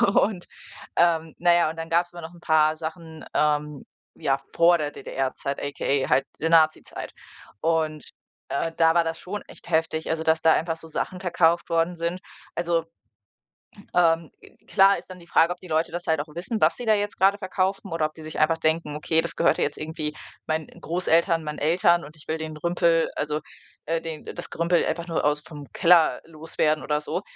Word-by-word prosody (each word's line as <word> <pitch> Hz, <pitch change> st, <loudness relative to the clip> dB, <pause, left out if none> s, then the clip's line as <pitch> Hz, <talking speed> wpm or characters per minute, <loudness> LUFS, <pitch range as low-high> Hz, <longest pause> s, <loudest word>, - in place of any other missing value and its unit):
Und, 195 Hz, -4 st, +2 dB, 0.5 s
ähm, 165 Hz, -2 st, +2 dB
na 175 Hz, 0 st, +5 dB
ja, 170 Hz, -2 st, +3 dB
und 160 Hz, -, -7 dB
dann 165 Hz, 0 st, -5 dB
gab's 175 Hz, +1 st, +1 dB
immer 175 Hz, -, -9 dB
noch 165 Hz, +1 st, -9 dB
'n 170 Hz, -, -16 dB
paar 155 Hz, -1 st, +3 dB
Sachen, 160 Hz, 0 st, -7 dB
ähm, 150 Hz, -1 st, 0 dB, 0.3 s
ja, 135 Hz, 0 st, 0 dB, 0.2 s
vor 170 Hz, +1 st, +5 dB
der 150 Hz, -2 st, -3 dB
DDR-Zeit, 135 Hz, 0 st, -4 dB
aka 140 Hz, -1 st, -1 dB
halt 135 Hz, +2 st, +3 dB, 0.2 s
der 160 Hz, -, +1 dB
Nazizeit 160 Hz, -1 st, +2 dB, 0.5 s
und, 160 Hz, -2 st, 0 dB, 0.5 s
äh, 165 Hz, +4 st, -1 dB
da 165 Hz, 0 st, +4 dB
war 170 Hz, -, +5 dB
das 165 Hz, 0 st, -3 dB
schon 205 Hz, +3 st, -5 dB
echt -, -, -15 dB
heftig, 160 Hz, -1 st, 0 dB
also, 160 Hz, 0 st, -1 dB
dass 160 Hz, 0 st, +2 dB
da 160 Hz, 0 st, +5 dB
einfach 165 Hz, 0 st, 0 dB
so 160 Hz, -, -10 dB
Sachen 180 Hz, +3 st, -3 dB
verkauft 170 Hz, -2 st, +2 dB
worden 165 Hz, +1 st, +1 dB
sind. 170 Hz, +2 st, -2 dB, 0.4 s
Also 170 Hz, -1 st, 0 dB, 1.1 s
ähm. 165 Hz, -2 st, +3 dB, 0.4 s
Klar 195 Hz, 0 st, +5 dB
ist -, -, -11 dB
dann 185 Hz, -1 st, -10 dB
die 170 Hz, -, -16 dB
Frage, 170 Hz, 0 st, +4 dB
ob 180 Hz, -, -21 dB
die 185 Hz, -, -12 dB
Leute 160 Hz, 0 st, 0 dB
das 175 Hz, 0 st, -6 dB
halt 160 Hz, -1 st, +2 dB
auch 145 Hz, -, -3 dB
wissen, 200 Hz, +6 st, -3 dB
was -, -, +4 dB
sie 245 Hz, -, -6 dB
da 220 Hz, -, +4 dB
jetzt 205 Hz, 0 st, -2 dB
gerade 195 Hz, +1 st, +4 dB
verkaufen 190 Hz, -1 st, -2 dB
oder 165 Hz, -1 st, 0 dB
ob 155 Hz, -, -4 dB
die 160 Hz, -, -11 dB
sich 155 Hz, 0 st, -6 dB
einfach 160 Hz, +2 st, +3 dB
denken: 160 Hz, -1 st, 0 dB
„Okay, 160 Hz, +2 st, +1 dB
das 170 Hz, -, -3 dB
gehörte -, -, +2 dB
jetzt -, -, -1 dB
irgendwie 155 Hz, -1 st, -4 dB, 0.3 s
meinen 155 Hz, -1 st, -1 dB
Großeltern, 170 Hz, -1 st, +2 dB
meinen 150 Hz, -1 st, -5 dB
Eltern, 170 Hz, +2 st, +3 dB
und 150 Hz, +2 st, -12 dB
ich 155 Hz, -, -18 dB
will 160 Hz, -, -1 dB
den 155 Hz, -1 st, -6 dB
Rümpel, 170 Hz, 0 st, +2 dB
also, 150 Hz, 0 st, -1 dB, 0.5 s
äh, 165 Hz, +1 st, -1 dB
den 160 Hz, -2 st, -7 dB
das -, -, -6 dB
Gerümpel 170 Hz, +1 st, +1 dB
einfach 170 Hz, +1 st, -3 dB
nur 165 Hz, -, -1 dB
aus 150 Hz, 0 st, +1 dB
vom 150 Hz, -2 st, -11 dB
Keller 170 Hz, -3 st, +4 dB
loswerden 155 Hz, -1 st, -1 dB
oder 150 Hz, 0 st, 0 dB
so.“, 175 Hz, -, -3 dB
165 Hz, 200 wpm, -25 LUFS, 155-175 Hz, 1.1 s, na